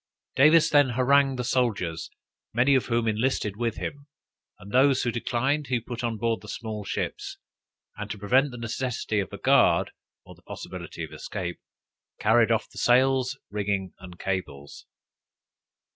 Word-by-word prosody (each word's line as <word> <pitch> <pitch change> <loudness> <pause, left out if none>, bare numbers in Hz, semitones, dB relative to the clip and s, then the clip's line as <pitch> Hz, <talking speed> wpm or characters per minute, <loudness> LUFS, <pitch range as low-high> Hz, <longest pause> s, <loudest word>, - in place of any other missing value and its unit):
Davis 155 +4 +6
then 145 -2 +4
harrangued 135 +1 +3
the 125 - -2
soldiers, 105 -11 -1 0.5
many 125 +4 +4
of 130 - +2
whom 115 -1 0
enlisted 110 -2 0
with 115 0 -2
him; 145 0 -6 0.5
and 100 - -12
those 135 +2 +4
who 120 - 0
declined, 130 +5 -1
he 125 -1 0
put 120 +1 -7
on 115 -2 -2
board 115 +1 -1
the 105 - -13
small 110 -1 -5
ships, - - -4 0.6
and 105 0 -6
to 105 - -5
prevent 125 +8 +2
the 120 - -9
necessity 115 -2 -2
of 95 - -3
a - - -7
guard, - - +3 0.3
or - - -12
the - - -22
possibility - - -8
of - - -7
escape, 90 -4 -5 0.6
carried - - +4
off - - +1
the - - -10
sails, 130 +1 +3
rigging 100 -2 -2
and 90 -1 -11
cables. 80 -8 -5
120 Hz, 160 wpm, -26 LUFS, 105-130 Hz, 0.6 s, Davis